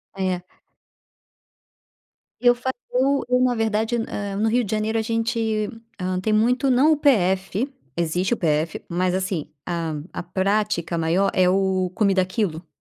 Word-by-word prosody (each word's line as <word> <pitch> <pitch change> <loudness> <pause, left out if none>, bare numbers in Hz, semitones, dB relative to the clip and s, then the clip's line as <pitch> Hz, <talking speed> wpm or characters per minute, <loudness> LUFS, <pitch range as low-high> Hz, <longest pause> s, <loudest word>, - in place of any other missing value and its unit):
É. 185 -2 -1 2.0
Eu 245 0 +6
fa 250 +2 -3 0.2
Eu 270 +2 +2
eu, 250 0 +3
na 250 -1 +3
verdade, 225 +1 0
hã, 205 -3 -4
no 220 - +1
Rio 245 +2 +2
de 205 - -5
Janeiro 215 +1 0
a - - +2
gente, 225 -1 -1 0.3
hã, 185 0 -1
tem 215 +4 -1
muito 250 +5 +2
não 265 +5 +5
o - - 0
PF, 200 -2 +1 0.2
existe 175 +6 0
o - - -1
PF, 155 -1 0
mas, 180 +1 0
assim, 185 -5 -2 0.2
a 170 -2 -2 0.2
a - - -4
prática 190 -1 0
maior 170 +4 +2
é 185 -1 +4
o 190 -1 +1
comida 195 -3 +3
a - - 0
quilo. 180 -4 -2
200 Hz, 160 wpm, -23 LUFS, 180-230 Hz, 2.0 s, Eu